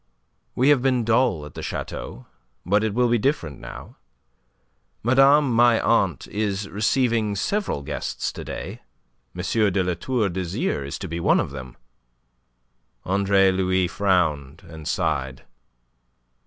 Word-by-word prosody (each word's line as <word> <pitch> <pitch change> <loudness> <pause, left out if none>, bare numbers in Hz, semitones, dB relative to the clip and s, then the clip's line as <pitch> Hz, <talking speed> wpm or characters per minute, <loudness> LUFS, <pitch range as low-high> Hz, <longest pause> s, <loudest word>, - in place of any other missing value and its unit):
We 130 +3 +3
have 145 -4 +5
been 130 -2 +1
dull 110 - +2
at 75 - -11
the - - -7
chateau; 65 - -6 0.4
but 100 +4 +2
it 110 -2 -1
will 125 0 +3
be 120 0 +2
different 95 - -1
now. - - -10 1.1
Madame 135 +3 +5
my 120 0 +5
aunt - - +1
is 105 -1 -2
receiving 110 0 +1
several 195 - -2
guests - - -3
to - - -8
day. - - -7 0.5
M. 90 - -4 0.3
de 95 0 +1
La 90 0 0
Tour 110 +5 -1
d'Azyr 85 -5 -2
is 70 - -5
to - - -6
be 85 +1 -4
one - - +3
of - - -2
them." 65 -3 -9 1.3
Andre 100 0 +3
Louis 95 -1 +1
frowned 85 -5 0
and 80 -2 -9
sighed. 65 -1 -2
100 Hz, 140 wpm, -23 LUFS, 85-120 Hz, 1.3 s, have